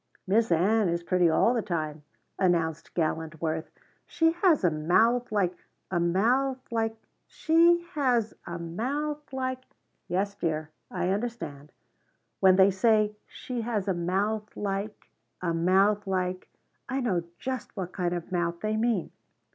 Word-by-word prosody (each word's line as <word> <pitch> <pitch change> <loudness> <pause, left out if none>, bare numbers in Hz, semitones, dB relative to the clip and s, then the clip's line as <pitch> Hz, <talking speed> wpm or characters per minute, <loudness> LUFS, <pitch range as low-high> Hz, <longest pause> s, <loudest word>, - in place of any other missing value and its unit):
"Miss 220 +3 +2
Ann 195 +4 +3
is 170 0 -1
pretty 180 -1 +3
all 160 +9 +3
the 235 - 0
time," 155 -6 -3 0.4
announced 170 -4 +1
gallant 160 -1 -1
Worth. 160 0 -2 0.4
"She 325 -1 +2
has 345 - +3
a 175 - +4
mouth 220 +11 +2
like 190 -4 +1 0.4
a 175 - +1
mouth 235 +10 +2
like 225 -1 0 0.3
She 340 +1 +4
has 245 -7 +1
a 170 0 -4
mouth 280 - -3
like 260 -1 -3 0.3
" - - -47
"Yes 195 +3 -1
dear, 155 -5 -3 0.2
I 180 - -1
understand. 195 -9 -4 0.7
When 190 -1 +6
they 190 +1 +6
say 210 +1 +2
'She 250 -2 -5
has 220 -4 -2
a 190 - +2
mouth 200 +5 -1
like 200 +1 -4 0.3
a 170 -2 -1
mouth 195 +5 +3
like 185 -1 -2 0.2
' - - -36
I 260 +2 -1
know 205 -9 0 0.2
just 260 -5 -5
what 185 -2 -4
kind 180 -2 -1
of 175 +1 -6
mouth 170 -1 -1
they 215 0 -1
mean." 220 -5 0
195 Hz, 150 wpm, -28 LUFS, 170-235 Hz, 0.7 s, When